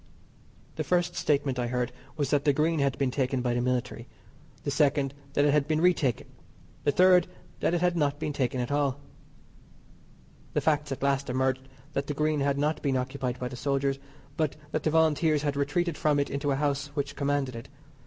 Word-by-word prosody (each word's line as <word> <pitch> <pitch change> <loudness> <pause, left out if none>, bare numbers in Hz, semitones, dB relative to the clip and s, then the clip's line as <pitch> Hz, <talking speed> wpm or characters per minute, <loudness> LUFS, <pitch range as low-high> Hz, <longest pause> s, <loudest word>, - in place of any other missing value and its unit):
The - - 0
first 175 -1 +1
statement 140 -3 0
I 120 - 0
heard 125 0 -1 0.3
was 145 -3 -1
that 145 -1 +2
the 145 -2 +4
Green 155 +3 +1
had 140 -2 +1
been 135 -2 +1
taken 130 -1 0
by 120 -1 +1
the 120 - 0
military; 125 -1 -2 0.6
the 145 - -1
second 140 -1 +2 0.2
that 145 - +3
it 145 - +4
had 150 -1 +2
been 155 -1 +1
re 180 +2 +5
taken; 130 -8 -1 0.6
the - - +4
third 180 +2 +5 0.3
that 175 - +1
it 170 - 0
had 180 -1 +2
not 145 -3 +1
been 155 -1 -3
taken 130 -2 -1
at 125 +2 -2
all. 145 -1 +1 1.5
The - - +2
facts 150 -2 +1
at 135 - -4
last 140 -1 +1
emerged 130 +1 0 0.3
that 140 0 -2
the 145 - -3
Green 150 0 +1
had 140 0 +1
not 150 +2 0
been 135 -3 +1
occupied 125 -1 -3
by 125 - -3
the 125 - -7
soldiers, 140 +1 0 0.4
but 155 -4 0 0.2
that 155 - -1
the 155 - +1
Volunteers 155 -1 +3
had 145 -1 0
retreated 155 +5 0
from 150 -2 +2
it 140 - -1
into 140 +1 -1
a 135 - +2
house 145 0 0
which 145 -2 -2
commanded 140 -3 -1
it. 115 - -8
140 Hz, 205 wpm, -28 LUFS, 130-150 Hz, 1.5 s, re